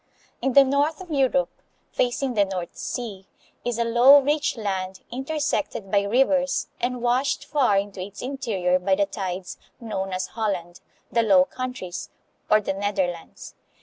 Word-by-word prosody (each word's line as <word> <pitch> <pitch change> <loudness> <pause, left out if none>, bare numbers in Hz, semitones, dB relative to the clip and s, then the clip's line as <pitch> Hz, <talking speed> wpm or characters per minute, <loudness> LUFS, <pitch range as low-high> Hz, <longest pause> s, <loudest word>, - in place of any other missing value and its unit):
In 265 - 0
the 275 - +9
north 285 +3 +1
of 365 -3 -10
Europe, 270 -2 +1 0.3
facing 250 +1 0
the 205 -3 +4
North 185 -3 -5
Sea, 200 -6 -5 0.4
is 240 -2 -2
a 235 - +2
low, 240 +5 +7
rich 290 -1 0
land, 190 -3 -3
intersected 270 -6 -2
by 200 - +4
rivers 270 +6 +2
and 245 0 -2
washed 255 +3 +1
far 265 -9 +2
into 195 -1 -2
its 195 +2 -8
interior 220 -10 0
by 190 +1 +2
the 200 +1 +2
tides, 190 -3 -5 0.2
known 195 -4 -4
as 185 0 -3
Holland, 190 -6 -3 0.3
the 230 - +3
Low 195 -5 +5
Countries, 250 -7 -6 0.4
or 215 - +6
the 205 - -2
Netherlands. 190 -4 -3
225 Hz, 150 wpm, -24 LUFS, 190-265 Hz, 0.4 s, the